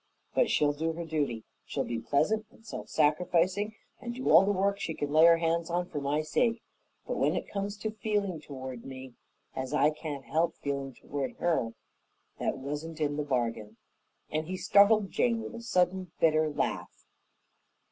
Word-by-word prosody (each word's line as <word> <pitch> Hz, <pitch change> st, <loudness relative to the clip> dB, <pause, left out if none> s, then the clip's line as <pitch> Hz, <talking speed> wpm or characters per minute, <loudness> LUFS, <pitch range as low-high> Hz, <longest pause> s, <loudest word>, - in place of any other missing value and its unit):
But -, -, +3 dB
she'll 145 Hz, -1 st, +3 dB
do 160 Hz, +2 st, -1 dB
her 170 Hz, +1 st, -5 dB
duty. 145 Hz, -8 st, -1 dB, 0.2 s
She'll -, -, -2 dB
be 115 Hz, -1 st, -3 dB
pleasant 210 Hz, -, +1 dB
and 225 Hz, -, -22 dB
self -, -, -7 dB
sacrificing 180 Hz, +7 st, +2 dB, 0.2 s
and 240 Hz, -1 st, -5 dB
do 260 Hz, -, 0 dB
all 165 Hz, +4 st, +9 dB
the 200 Hz, -, +2 dB
work 200 Hz, +1 st, +1 dB
she 160 Hz, -, -3 dB
can 145 Hz, 0 st, -3 dB
lay 155 Hz, +2 st, +7 dB
her 170 Hz, 0 st, +7 dB
hands 165 Hz, 0 st, 0 dB
on 175 Hz, +1 st, 0 dB
for 145 Hz, -, -4 dB
my 145 Hz, +2 st, 0 dB
sake; 230 Hz, +9 st, +1 dB, 0.4 s
but -, -, -3 dB
when -, -, +2 dB
it -, -, -3 dB
comes 200 Hz, 0 st, -3 dB
to 215 Hz, +1 st, -3 dB
feeling 205 Hz, -6 st, -1 dB
toward 130 Hz, -4 st, -7 dB
me 130 Hz, -1 st, -9 dB, 0.4 s
as 130 Hz, +2 st, -3 dB
I 150 Hz, 0 st, +4 dB
can't 150 Hz, -3 st, -6 dB
help 165 Hz, +2 st, +1 dB
feeling 140 Hz, -2 st, -4 dB
toward 140 Hz, 0 st, -4 dB
her 135 Hz, -10 st, 0 dB, 0.6 s
that -, -, -1 dB
wasn't 150 Hz, +4 st, -5 dB
in 145 Hz, -1 st, 0 dB
the 150 Hz, -, -1 dB
bargain," 115 Hz, -5 st, -2 dB, 0.5 s
and 155 Hz, +1 st, -1 dB
he 185 Hz, +1 st, -3 dB
startled 200 Hz, +2 st, +5 dB
Jane 235 Hz, -2 st, +2 dB
with 225 Hz, -, -6 dB
a 235 Hz, -, -7 dB
sudden 185 Hz, -5 st, +1 dB
bitter 155 Hz, -1 st, +4 dB
laugh. 145 Hz, -, -3 dB
160 Hz, 180 wpm, -30 LUFS, 145-195 Hz, 0.6 s, all